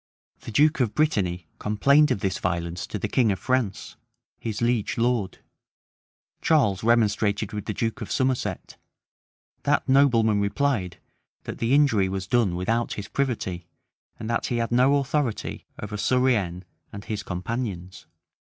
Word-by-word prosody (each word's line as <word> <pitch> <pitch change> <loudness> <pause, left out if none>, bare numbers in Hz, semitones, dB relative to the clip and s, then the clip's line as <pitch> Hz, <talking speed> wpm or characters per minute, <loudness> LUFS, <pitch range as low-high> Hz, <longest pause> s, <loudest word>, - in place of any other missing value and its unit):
[*] - - -49
The - - -6
duke 150 +7 +3
of 120 -5 0
Brittany 95 - 0
complained 140 +8 +3
of 100 - -1
this 95 -2 -1
violence 85 -1 -2
to - - -4
the 95 - -2
king 120 -5 +2
of 95 - -1
France, 130 -5 -2 0.4
his 110 -3 -4
liege 120 -3 0
lord: 115 -4 0 1.0
Charles 115 - +2
remonstrated 110 -3 +1
with 105 -1 -4
the 105 - -3
duke 115 -2 -2
of - - -6
Somerset: 130 -1 -1 0.8
that - - +1
nobleman 120 -6 +4
replied, 100 -4 0 0.5
that - - -7
the 120 +4 +2
injury 115 -10 +3
was 95 0 -3
done 105 -4 +1
without 115 +6 -1
his 105 -1 -6
privity, 100 -11 -2 0.5
and 110 - -6
that 115 - -1
he 120 - -1
had 115 0 -1
no 130 +4 +4
authority 140 -3 -2
over 105 0 -5
Surienne 105 -8 +1 0.3
and 100 0 -9
his 105 -2 -3
companions. 95 -3 -5
110 Hz, 150 wpm, -25 LUFS, 95-125 Hz, 1.0 s, nobleman